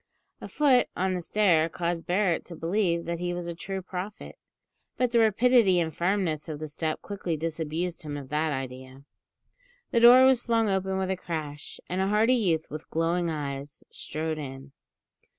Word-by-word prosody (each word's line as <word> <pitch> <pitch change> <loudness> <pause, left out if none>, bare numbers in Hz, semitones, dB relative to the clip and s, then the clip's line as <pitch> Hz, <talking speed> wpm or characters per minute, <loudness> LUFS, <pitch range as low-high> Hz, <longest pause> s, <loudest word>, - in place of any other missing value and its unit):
A - - -6
foot 275 -4 +3
on 185 +1 0
the 180 - -2
stair 170 -4 +2
caused 170 0 -3
Barret 180 -1 +1
to 170 - -8
believe 170 0 0
that 170 0 -3
he 175 0 -2
was 175 -1 -5
a 170 - -3
true 190 +3 -5
prophet; 190 +3 -7 0.6
but 250 -2 +1
the 235 - +4
rapidity 225 -3 +4
and 160 -2 -2
firmness 170 -4 -1
of 155 - -4
the 155 +1 -6
step 155 +1 -3
quickly 190 -5 -3
disabused 165 +2 -3
him 145 -2 -5
of 135 -2 -9
that 155 +1 0
idea. 130 0 -6 0.9
The 235 - +3
door 245 +2 +9
was 260 -2 +4
flung 230 -2 +1
open 190 -1 0
with 190 0 -1
a - - 0
crash, 155 -5 -6
and 185 +1 -2
a 190 - +1
hearty 215 +4 +3
youth 175 -10 +1
with 155 +1 -8
glowing 170 +1 0
eyes 140 -2 -5
strode 155 +1 -4
in. 135 -1 -8
170 Hz, 180 wpm, -27 LUFS, 155-195 Hz, 0.9 s, door